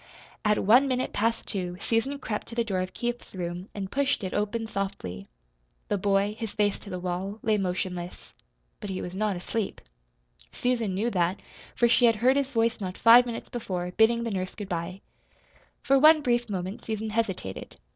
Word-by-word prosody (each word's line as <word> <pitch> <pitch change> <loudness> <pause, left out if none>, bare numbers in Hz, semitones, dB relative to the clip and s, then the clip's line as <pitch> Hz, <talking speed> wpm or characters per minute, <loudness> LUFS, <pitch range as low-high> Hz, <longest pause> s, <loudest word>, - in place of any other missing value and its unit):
At 210 0 +2
one 245 +7 +6
minute 255 -1 -1
past 230 +2 0
two 180 -3 -3
Susan 230 +7 0
crept 215 -6 -4
to 230 - -8
the 235 - +2
door 195 -5 -1
of 185 0 -5
Keith's 240 -3 -4
room 180 +1 -5
and 195 -2 -5
pushed 280 -4 +1
it 185 - -3
open 210 +2 -1
softly. 145 - -4 0.6
The 205 - +1
boy, 200 +1 +1
his 225 -3 -4
face 205 -1 +1
to 205 - -11
the 185 - -4
wall, 185 +3 -3
lay 215 -1 +2
motionless. 180 -1 -4 0.5
But 205 - -6
he 185 -1 -3
was 180 - -5
not 205 0 0
asleep. 200 +4 -3 0.7
Susan 230 -6 0
knew 225 +5 0
that, 180 0 +1 0.4
for 240 - +4
she 245 +1 +5
had 230 -1 +5
heard 250 +5 +3
his 280 -1 0
voice 230 -2 +1
not 185 -1 -4
five 240 +2 +7
minutes 230 -1 -5
before, 180 -7 -3
bidding 225 +4 +3
the 230 - -2
nurse 185 -2 -3
good 205 -3 -7
bye. 175 +2 -4 0.8
For 275 -1 +4
one 310 +2 +7
brief 240 -2 +1
moment 190 +1 -4
Susan 220 0 -3
hesitated. 195 - -3
210 Hz, 185 wpm, -27 LUFS, 185-235 Hz, 0.8 s, five